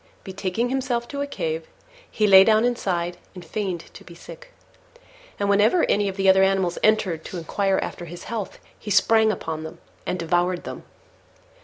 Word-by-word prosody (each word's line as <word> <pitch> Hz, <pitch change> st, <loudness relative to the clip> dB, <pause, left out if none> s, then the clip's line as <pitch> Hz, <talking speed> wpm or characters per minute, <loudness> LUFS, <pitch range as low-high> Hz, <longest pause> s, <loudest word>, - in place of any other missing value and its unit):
Betaking 195 Hz, +5 st, -2 dB
himself 255 Hz, -2 st, -1 dB
to 280 Hz, -1 st, -4 dB
a 285 Hz, -, -2 dB
cave, 160 Hz, -, -4 dB, 0.4 s
he 215 Hz, -, 0 dB
lay 190 Hz, -2 st, +8 dB
down 220 Hz, +2 st, +3 dB
inside 180 Hz, -8 st, -1 dB, 0.2 s
and 180 Hz, -2 st, -10 dB
feigned 190 Hz, -5 st, -3 dB
to -, -, -13 dB
be 170 Hz, -, -13 dB
sick: -, -, -13 dB, 0.9 s
and 200 Hz, -, 0 dB
whenever 210 Hz, -, +3 dB
any 205 Hz, -1 st, +1 dB
of 190 Hz, -, -7 dB
the 195 Hz, 0 st, +1 dB
other 190 Hz, 0 st, +6 dB
animals 190 Hz, -2 st, +1 dB
entered 200 Hz, -7 st, +1 dB
to 185 Hz, -, -6 dB
inquire 195 Hz, +3 st, 0 dB
after 175 Hz, -, -6 dB
his 170 Hz, +1 st, -9 dB
health, 220 Hz, -4 st, -5 dB, 0.2 s
he 210 Hz, -, -8 dB
sprang 220 Hz, +2 st, +4 dB
upon 160 Hz, -6 st, -5 dB
them 160 Hz, -, -8 dB, 0.3 s
and 185 Hz, -, -1 dB
devoured 175 Hz, +1 st, 0 dB
them. -, -, -8 dB
195 Hz, 175 wpm, -23 LUFS, 175-220 Hz, 0.9 s, lay